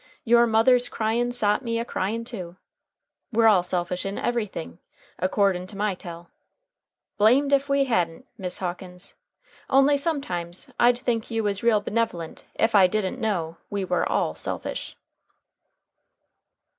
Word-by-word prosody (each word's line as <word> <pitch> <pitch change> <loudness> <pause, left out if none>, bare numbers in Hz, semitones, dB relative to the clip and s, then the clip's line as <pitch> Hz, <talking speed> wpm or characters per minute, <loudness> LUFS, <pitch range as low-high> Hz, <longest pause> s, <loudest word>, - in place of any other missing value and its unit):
Your 235 0 +5
mother's 240 +3 +4
cryin' 235 +2 0
sot 215 -3 +2
me 230 -1 -1
a 230 - -2
cryin' 225 +2 -3
too. 185 -8 -7 0.8
We're 230 0 +3
all 205 -5 +6
selfish 180 0 -2
in 195 0 -4
everything, 215 -8 -3 0.4
akordin' 185 -1 +1
to 200 - -10
my 205 0 0
tell. 175 -2 -10 0.9
Blamed 260 +7 +4
ef 280 0 +2
we 275 0 +3
ha'n't, 180 -2 -1
Miss 185 -4 -4
Hawkins, 180 0 -6 0.6
only 275 +1 +5
sometimes 260 - -3
I'd 240 0 +5
think 240 -3 -2
you 225 -1 -1
was 200 -1 -1
real 230 -3 +3
benev'lent 210 -8 -3
ef 225 +1 +1
I 195 -3 +7
didn't 195 0 -2
know 170 -7 -2
we 200 -2 -2
war 180 -1 0
all 80 - 0
selfish." 80 - -4
215 Hz, 140 wpm, -25 LUFS, 180-235 Hz, 0.9 s, I